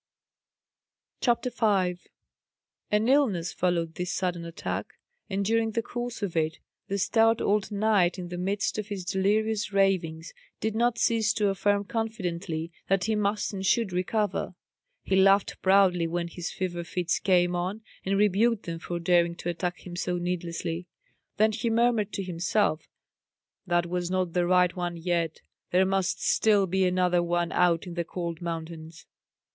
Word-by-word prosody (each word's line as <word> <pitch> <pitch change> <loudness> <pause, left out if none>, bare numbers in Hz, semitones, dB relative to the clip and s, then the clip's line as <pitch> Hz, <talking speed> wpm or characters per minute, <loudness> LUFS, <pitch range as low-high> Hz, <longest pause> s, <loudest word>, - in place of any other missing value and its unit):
CHAPTER 240 0 +1
5 190 -7 0 0.8
An 210 +2 +2
illness 225 - +2
followed 170 -2 0
this 180 +1 -3
sudden 180 -2 -2
attack; 170 +2 -5 0.3
and 195 0 -1
during 225 +1 +1
the 230 - 0
course 240 -2 -5
of 185 -4 -3
it 160 -1 0 0.3
the 200 - -1
stout 225 +3 +3
old 210 0 +1
knight, 200 -4 +2
in 180 -1 -6
the 175 - -5
midst 195 +3 -1
of 210 - -4
his 200 -4 -5
delirious 210 +3 0
ravings, 185 -4 0 0.3
did 220 0 -1
not 240 +1 +2
cease 225 -1 +2
to 210 -2 +1
affirm 200 +1 +1
confidently 180 -7 -3 0.2
that 195 -1 +2
he 220 - 0
must 210 0 0
and 190 -1 -4
should 225 -4 +2
recover. 190 +1 -1 0.5
He 190 - 0
laughed 195 +1 +4
proudly 190 -3 +4
when 170 +1 -2
his 175 0 -5
fever 175 -2 -3
fits 175 0 -1
came 180 -2 +3
on, 185 +5 -3 0.2
and 195 +1 0
rebuked 210 +2 +2
them 165 -1 -4
for 175 +1 -4
daring 170 0 +2
to 175 - -5
attack 175 +1 -3
him 175 -1 -7
so 180 0 -1
needlessly. 175 -1 -3 0.5
Then 215 +1 +4
he 230 +2 -1
murmured 230 -2 +2
to 195 - -2
himself, 175 -1 0 0.8
"That 175 -1 +2
was 175 0 -2
not 185 -2 -1
the 175 -1 +1
right 180 -1 +3
one 175 -1 -3
yet; 170 -1 -1 0.3
there 185 +1 +3
must 190 -1 0
still 205 -3 +3
be 190 +1 +1
another 180 -1 +2
one 175 0 0
out 175 -1 +2
in 175 - -7
the 170 0 -1
cold 170 -1 -5
mountains." 165 -1 -6
185 Hz, 160 wpm, -27 LUFS, 175-210 Hz, 0.8 s, laughed